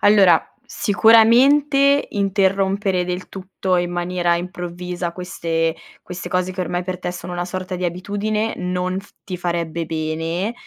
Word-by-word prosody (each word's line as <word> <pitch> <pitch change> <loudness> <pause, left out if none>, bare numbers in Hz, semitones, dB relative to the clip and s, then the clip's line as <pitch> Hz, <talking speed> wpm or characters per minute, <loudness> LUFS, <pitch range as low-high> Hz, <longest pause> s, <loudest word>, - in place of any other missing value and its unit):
allora 195 -5 +6 0.3
sicuramente 275 +7 +4
interrompere 195 -1 +1
del 180 0 -4
tutto 190 -1 -2
in 175 0 0
maniera 175 0 0
improvvisa 175 -1 -5
queste 165 -3 -2 0.3
queste 180 0 -7
cose 185 0 -1
che 185 - -5
ormai 180 0 -2
per 185 0 -4
te 180 - -3
sono 180 0 -7
una 175 0 -3
sorta 185 0 -5
di 180 0 -1
abitudine 205 +5 -2
non 180 +1 -2
f 205 - -20
ti 185 -2 -5
farebbe 170 -1 -2
bene, 165 +5 -2
180 Hz, 140 wpm, -20 LUFS, 175-200 Hz, 0.3 s, allora